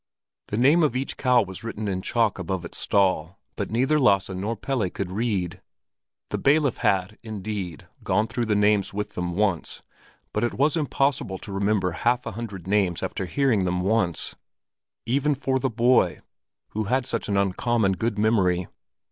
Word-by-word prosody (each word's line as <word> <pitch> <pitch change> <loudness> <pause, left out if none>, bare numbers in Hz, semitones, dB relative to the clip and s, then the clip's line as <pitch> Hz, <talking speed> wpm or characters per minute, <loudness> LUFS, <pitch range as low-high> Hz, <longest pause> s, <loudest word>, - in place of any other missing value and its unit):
The 105 - -3
name 140 +8 +5
of 150 -6 +2
each 130 +2 -2
cow 125 -3 +3
was 95 0 -9
written 110 -2 -4
in 95 -2 -1
chalk 115 -1 +1
above 90 0 -3
its - - -6
stall, 95 -3 +1 0.2
but - - -3
neither 130 +7 +2
Lasse 100 -8 +3
nor 100 +5 -2
Pelle 115 -3 -1
could 95 0 -5
read. 100 -5 -2 0.7
The - - -1
bailiff 140 -2 +3
had, 95 +2 0
indeed, 105 -6 -5 0.2
gone 105 - +2
through 115 +1 -2
the 105 - +2
names 105 -1 +2
with 105 0 -3
them 90 -1 -3
once, 100 -4 -1 0.5
but 105 - 0
it 120 - 0
was 145 +5 +2
impossible 140 - 0
to 100 - -10
remember 100 -1 +1
half 120 +7 0
a - - -3
hundred 100 -5 -7
names 95 -4 +1
after 95 - -3
hearing 130 -4 +2
them 90 0 0
once—even 115 - -2
for 130 -1 0
the 130 - 0
boy, 120 +2 +3 0.5
who 110 0 -3
had 125 +4 +1
such 115 -3 -3
an 100 - +1
uncommon 100 +2 +1
good 110 +3 -1
memory. 95 -5 +2
105 Hz, 170 wpm, -25 LUFS, 95-120 Hz, 0.7 s, name